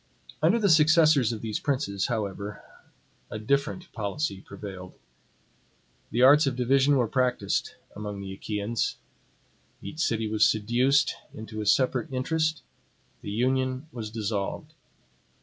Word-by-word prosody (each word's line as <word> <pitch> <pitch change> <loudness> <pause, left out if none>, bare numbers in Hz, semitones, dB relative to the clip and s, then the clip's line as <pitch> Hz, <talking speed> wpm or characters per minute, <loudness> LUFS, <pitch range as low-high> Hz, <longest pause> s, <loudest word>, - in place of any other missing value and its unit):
Under - - +4
the 215 -3 +2
successors 155 - +5
of 110 - -5
these 110 -2 -2
princes, 130 -9 -1
however, 105 -2 -4 0.7
a - - -5
different 140 - -1
policy 105 -1 -3
prevailed. 95 -2 -9 1.1
The 120 +3 +1
arts 145 +3 +7
of 130 - 0
division 135 +3 +3
were 125 -3 +2
practiced 125 +1 0 0.2
among 105 -1 -6
the 95 -1 -6
Achaeans. 105 +3 -2 0.8
Each 155 - -9
city 115 -8 0
was 110 0 +1
seduced 125 +7 +2 0.2
into 110 0 -6
a 105 - -4
separate 135 +6 +2
interest; 155 +4 -1 0.6
the - - -7
union 130 +5 0
was 110 -5 -6
dissolved. 105 -2 -3
120 Hz, 125 wpm, -27 LUFS, 105-140 Hz, 1.1 s, arts